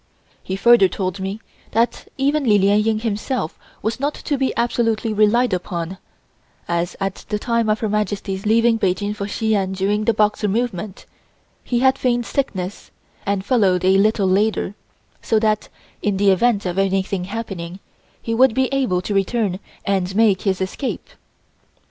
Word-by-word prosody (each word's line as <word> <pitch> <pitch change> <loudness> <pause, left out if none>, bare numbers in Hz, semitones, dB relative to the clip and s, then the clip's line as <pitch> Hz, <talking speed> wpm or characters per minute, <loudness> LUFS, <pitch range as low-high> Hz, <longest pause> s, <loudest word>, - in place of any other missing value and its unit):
He 190 - -4
further 235 0 +6
told 185 0 -3
me 195 +3 -4 0.3
that 230 +2 0
even 285 +2 +1
Li 215 -5 +4
Lien 200 +1 +4
Ying 220 0 +1
himself 220 - -2 0.2
was 220 +4 -1
not 285 +2 -1
to 290 - -2
be 265 -1 0
absolutely 230 -2 0
relied 215 +2 +3
upon, 180 0 -3 0.7
as 170 +1 -1
at 195 -1 -3
the 210 - 0
time 230 0 0
of 215 0 +1
Her 220 - 0
Majesty's 205 -1 -2
leaving 230 +1 +3
Peking 200 +2 0
for 200 -1 -5
Shi 220 +1 -1
An 190 -2 0
during 205 +3 0
the 230 - +3
Boxer 210 0 +2
movement, 210 -3 -3 0.6
he 240 -1 0
had 265 0 +3
feigned 240 -2 +1
sickness, 195 -10 -3 0.4
and 200 -1 0
followed 195 -6 +2
a 190 +1 +5
little 210 -1 +2
later, 200 +1 +1 0.5
so 225 - +1
that 215 -1 +1 0.3
in 205 -2 0
the 200 0 +4
event 205 +1 +2
of 180 +1 -1
anything 195 -1 0
happening, 190 -4 -6 0.4
he 230 - -3
would 250 0 +4
be 265 +1 +1
able 200 -10 +1
to 205 - -3
return 195 -1 0 0.3
and 190 -2 0
make 215 -3 +4
his 190 -2 0
escape. 250 - -4
210 Hz, 165 wpm, -20 LUFS, 190-230 Hz, 0.7 s, further